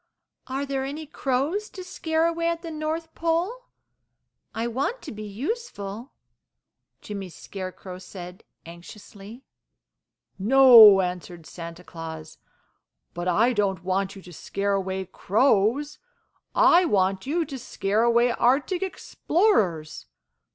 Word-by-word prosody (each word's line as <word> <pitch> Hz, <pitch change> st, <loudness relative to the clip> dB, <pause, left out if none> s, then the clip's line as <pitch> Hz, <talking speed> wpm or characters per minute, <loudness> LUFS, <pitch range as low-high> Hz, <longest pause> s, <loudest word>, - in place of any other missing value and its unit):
"Are 270 Hz, +2 st, -3 dB
there 270 Hz, -1 st, -2 dB
any 290 Hz, +4 st, -5 dB
crows 290 Hz, +9 st, -2 dB
to 370 Hz, -, -9 dB
scare 320 Hz, -3 st, -1 dB
away 335 Hz, 0 st, 0 dB
at 335 Hz, 0 st, -2 dB
the 330 Hz, -, -6 dB
North 315 Hz, +1 st, -4 dB
Pole? 345 Hz, +10 st, -1 dB, 0.9 s
I 225 Hz, +1 st, -3 dB
want 270 Hz, -, -2 dB
to 300 Hz, -, -7 dB
be 215 Hz, -, -8 dB
useful," 225 Hz, -, -5 dB, 0.9 s
Jimmy 200 Hz, -3 st, -6 dB
Scarecrow 185 Hz, 0 st, -8 dB
said, 180 Hz, -1 st, -10 dB, 0.2 s
anxiously. 200 Hz, +7 st, -12 dB, 1.0 s
"No," 225 Hz, -3 st, +8 dB
answered 180 Hz, -2 st, -5 dB
Santa 170 Hz, +1 st, -9 dB
Claus, 160 Hz, -2 st, -9 dB, 0.7 s
"but 175 Hz, +1 st, -4 dB
I 220 Hz, +8 st, +3 dB
don't 195 Hz, -5 st, -1 dB
want 190 Hz, +1 st, -1 dB
you 195 Hz, -, -12 dB
to 180 Hz, -, -12 dB
scare 200 Hz, +5 st, -2 dB
away 190 Hz, -1 st, -2 dB
crows. 240 Hz, +9 st, +1 dB, 0.6 s
I 350 Hz, +2 st, +6 dB
want 195 Hz, -, +1 dB
you 330 Hz, +3 st, 0 dB
to 275 Hz, -4 st, -7 dB
scare 210 Hz, -2 st, -1 dB
away 235 Hz, +1 st, +3 dB
Arctic 270 Hz, +10 st, +1 dB
Explorers. 260 Hz, -, 0 dB
225 Hz, 120 wpm, -25 LUFS, 190-305 Hz, 1.0 s, No